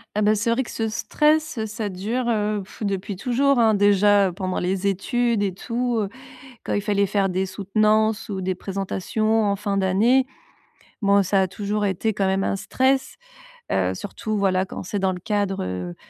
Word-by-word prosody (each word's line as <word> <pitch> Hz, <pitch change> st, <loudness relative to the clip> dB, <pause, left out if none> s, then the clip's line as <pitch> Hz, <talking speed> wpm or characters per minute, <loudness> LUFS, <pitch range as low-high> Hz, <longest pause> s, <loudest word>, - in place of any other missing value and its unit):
Ah 210 Hz, -, +1 dB
bah 210 Hz, -, +4 dB
c'est 215 Hz, +2 st, 0 dB
vrai 235 Hz, +3 st, +2 dB
que -, -, -9 dB
ce 225 Hz, -1 st, -2 dB
stress, 305 Hz, +4 st, +1 dB
heu, 220 Hz, -, -1 dB
ça 215 Hz, 0 st, -4 dB
dure, 210 Hz, +7 st, -3 dB
heu 210 Hz, -2 st, 0 dB
pff 190 Hz, -, -16 dB
depuis 200 Hz, 0 st, -2 dB
toujours, 260 Hz, +5 st, +1 dB
hein. 220 Hz, -2 st, +4 dB
Déjà, 205 Hz, -1 st, +4 dB
heu, -, -, -6 dB
pendant 185 Hz, 0 st, -3 dB
les 190 Hz, +2 st, -1 dB
études 225 Hz, +3 st, 0 dB
et 195 Hz, -, -1 dB
tout, 240 Hz, +4 st, -2 dB
heu, 200 Hz, -, -1 dB, 0.5 s
quand -, -, -3 dB
il 205 Hz, -, +1 dB
fallait 200 Hz, -1 st, +1 dB
faire 195 Hz, 0 st, +1 dB
des 190 Hz, +1 st, -1 dB
soutenances, 215 Hz, +3 st, +1 dB
ou 195 Hz, -, -3 dB
des 185 Hz, 0 st, -1 dB
présentations 200 Hz, +4 st, -1 dB
en 200 Hz, -1 st, +1 dB
fin 200 Hz, 0 st, -2 dB
d'année, 220 Hz, +8 st, +3 dB, 0.8 s
bon 200 Hz, 0 st, +4 dB
ça 195 Hz, +1 st, +2 dB
a -, -, +2 dB
toujours 210 Hz, +2 st, -2 dB
été 205 Hz, +3 st, 0 dB
quand 195 Hz, -1 st, 0 dB
même 190 Hz, 0 st, +1 dB
un 195 Hz, -, 0 dB
stress. 265 Hz, +6 st, 0 dB, 0.6 s
Heu, -, -, +1 dB
surtout 215 Hz, -1 st, -4 dB
voilà, 190 Hz, -1 st, +2 dB
quand -, -, -7 dB
c'est 200 Hz, +2 st, -3 dB
dans 190 Hz, 0 st, +1 dB
le 180 Hz, -, -5 dB
cadre, 205 Hz, -1 st, -1 dB
heu 90 Hz, -1 st, -5 dB
205 Hz, 200 wpm, -23 LUFS, 190-220 Hz, 0.8 s, bah